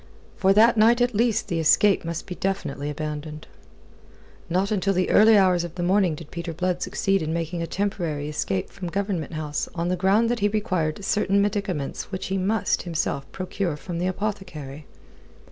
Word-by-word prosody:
For 190 - +3
that 230 +3 +5
night 230 +3 +5
at 245 0 +2
least 230 +1 +1
the 170 - -1
escape 195 +5 +4
must 165 -1 -4
be 180 - -6
definitely 160 -7 -3
abandoned. 150 0 -5 1.0
Not 190 +4 0
until 195 -1 +1
the 185 0 +1
early 215 +1 +7
hours 185 -3 +4
of 170 -1 -7
the 175 - -3
morning 185 -2 +2
did 155 0 -11
Peter 170 -1 -5
Blood 180 +2 -1
succeed 195 0 0
in 155 0 -2
making 170 +1 -3
a 165 - -2
temporary 170 -8 -2
escape 100 -11 -2
from 195 -3 -6
Government 190 -3 -2
House 150 -1 -3
on 170 0 -1
the 180 - +1
ground 195 +5 +3
that 240 - -1
he 205 - +3
required 195 -5 -1
certain 200 -1 +2
medicaments 200 -9 -2
which 185 - -4
he 195 0 0
must, 200 +1 +1
himself, 155 -5 -3
procure 185 -3 -3
from 170 +2 -5
the 180 - 0
apothecary. 180 -8 -5
185 Hz, 180 wpm, -24 LUFS, 160-200 Hz, 1.0 s, early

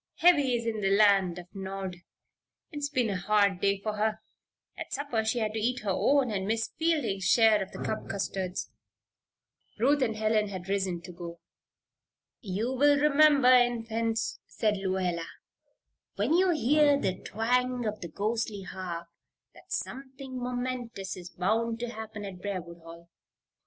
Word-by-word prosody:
"Heavy 290 -8 +4
is 235 -1 -3
in 220 -2 -2
the 195 - +2
Land 195 -3 +4
of 175 - -8
Nod. 190 -2 -5 0.7
It's 290 -2 -3
been 250 -6 +1
a 190 - -1
hard 200 -1 +2
day 200 0 +2
for 215 +1 -3
her. 215 +1 0 0.6
At - - -7
supper 265 -6 -1
she 220 +3 0
had 215 -2 -1
to 220 - -2
eat 245 +3 0
her 205 -2 -1
own 275 +2 +2
and 195 -2 -2
Miss 225 +1 0
Fielding's 295 - 0
share 220 +2 +5
of 190 - -5
the - - -7
cup 220 - -3
custards." 190 -1 -3 1.1
Ruth 275 +6 +3
and 225 -4 +1
Helen 215 -1 +1
had 190 -2 -5
already 190 +3 -3
risen 190 -3 -1
to 180 - -9
go. 170 -1 -8 1.0
"You'll 225 +5 -3
remember, 290 -2 +5
Infants," 230 -2 +1
said 215 -2 0
Lluella, 185 -3 -1 0.9
"when 215 +10 +1
you 370 +2 +4
hear 295 -1 +4
the 185 -5 -1
twang 245 +3 0
of 215 0 -3
the 170 - -4
ghostly 210 +2 -2
harp, 175 -2 -6 0.5
that - - -18
something 265 0 -5
momentous 245 -5 -4
is 180 -1 -9
bound 225 +6 0
to 240 0 -3
happen 220 -2 -7
at 185 -2 -8
Briarwood 180 -4 -5
Hall." 170 +1 -13
220 Hz, 155 wpm, -29 LUFS, 190-250 Hz, 1.1 s, share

